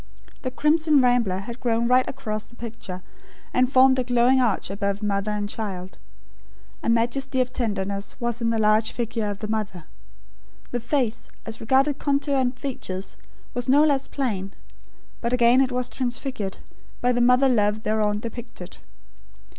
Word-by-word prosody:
The 255 - -2
crimson 300 +2 +3
rambler 245 -7 +3
had 235 +4 -8
grown 235 -1 +1
right 255 +1 +4
across 215 -6 -4
the 235 - -18
picture, 215 -6 -7 0.5
and 255 +1 +2
formed 260 0 +6
a - - +1
glowing 245 +1 +3
arch 225 -5 0
above 200 +1 -2
mother 200 0 0
and 210 -1 -1
child. 190 -4 -6 0.8
A - - -1
majesty 250 +4 +1
of 255 0 0
tenderness 200 -4 -3
was 235 -1 -2
in 230 - +1
the 230 - +1
large 215 +1 +3
figure 225 -2 -2
of 205 - -4
the 215 - -5
mother. 210 -5 -3 0.9
The 245 - -1
face, 235 -2 -1 0.2
as 225 0 -7
regarded 265 +5 +2
contour 280 0 0
and 255 -1 0
features, 195 -9 -5 0.4
was 245 +1 -3
no 285 +3 +6
less 280 -3 +2
plain; 200 -8 -3 0.7
but 235 +1 -1
again 245 +1 +5
it 265 -1 +1
was 250 0 0
transfigured, 250 -5 -3 0.4
by 245 - +2
the 245 0 +1
mother 250 +2 +5
love 215 -3 +2
thereon 210 -1 +1
depicted. 230 -5 -8
235 Hz, 160 wpm, -24 LUFS, 210-255 Hz, 0.9 s, formed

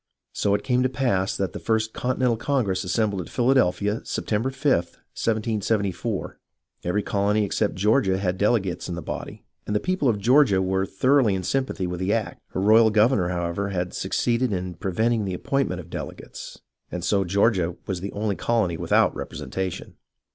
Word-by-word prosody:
So 100 0 +1
it 105 - -3
came 125 -1 +2
to 130 - +2
pass 120 -8 0
that 95 -2 -2
the - - -5
First 110 -1 0
Continental 125 -1 0
Congress 115 -7 0
assembled 100 +1 0
at - - -9
Philadelphia, 115 -5 +2
September 110 +4 -1
5, 135 +1 +1
1774. 105 +2 -2 0.4
Every 100 +4 0
colony 105 +2 +1
except 105 +1 0
Georgia 100 0 +2
had 95 -1 -1
delegates 100 -5 0
in 85 - -3
the 85 - -6
body, - - -6 0.2
and 105 - -1
the - - +3
people 185 - 0
of 110 - +1
Georgia 120 -2 +4
were 95 +1 0
thoroughly 130 0 +3
in 95 - -3
sympathy 130 -3 -1
with 90 0 -4
the 95 +3 0
act. 115 -2 -2
Her 95 - -3
royal 110 +3 +6
governor, 105 -3 +3
however, 85 +3 -2
had 90 -2 -2
succeeded 120 0 0
in 90 -2 -3
pre 95 +3 -4
venting 110 +3 +1
the 95 -2 -3
appointment 135 -3 -1
of 85 -1 -11
delegates, - - -8 0.3
and 90 - -4
so 100 +2 +2
Georgia 95 -2 +1
was 95 -3 -3
the 100 - -4
only 105 -1 -1
colony 95 -2 0
without - - +2
representation. 95 -2 -5
105 Hz, 175 wpm, -24 LUFS, 95-115 Hz, 0.4 s, royal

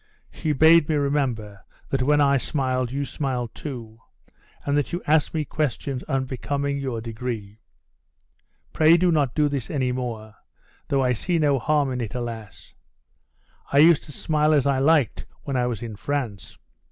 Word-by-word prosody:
She 155 - -2
bade 160 +2 +5
me 155 - +2
remember, 130 -8 -1 0.3
that 135 - +1
when 145 +3 +3
I 140 -1 +4
smiled, 130 -2 -1
you 140 +2 -2
smiled 125 -4 -3
too; 115 -6 -8 0.7
and 140 - +1
that 145 -4 0
you 175 - -3
asked 155 0 +3
me 155 -1 0
questions 140 -2 -2
unbecoming 140 +2 -2
your 130 -5 -3
degree. 110 -2 -6 1.1
Pray 160 +2 +5
do 180 0 +3
not 145 -7 +1
do 150 -1 +3
this 140 -4 -3
any 130 -5 0
more; 115 -4 -5 0.5
though 135 -1 +1
I 125 -1 +2
see 170 - -1
no 145 -4 +2
harm 145 +1 +1
in 125 -1 -3
it; 115 -1 -5
alas! 110 -6 -7 1.0
I 140 - +2
used 160 +1 +7
to 150 - -10
smile 155 +1 +1
as 140 - +2
I 140 -1 +2
liked 145 -1 +2 0.2
when 140 - -4
I 125 -1 +1
was 120 -2 -4
in 115 -3 -6
France. 120 -5 -4
135 Hz, 165 wpm, -24 LUFS, 120-150 Hz, 1.1 s, used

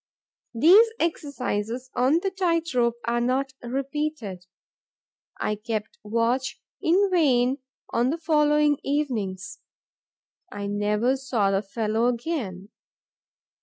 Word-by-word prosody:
These 375 - +7
exercises 255 -6 -2
on 270 +7 +3
the 390 - 0
tight 335 -4 0
rope 235 -2 +2
are 235 0 0
not 265 +2 0
repeated. 260 - -4 0.9
I 210 - 0
kept 215 0 -5
watch 230 +5 -1 0.2
in 380 +4 +3
vain 265 -6 +3 0.3
on 240 +2 +2
the 315 - -1
following 300 -2 +3
evenings: 255 -5 -2 0.9
I 205 0 -5
never 210 +5 +1
saw 235 -7 0
the 195 0 +1
fellow 220 +2 -1
again. 235 - -3
250 Hz, 105 wpm, -25 LUFS, 215-300 Hz, 0.9 s, These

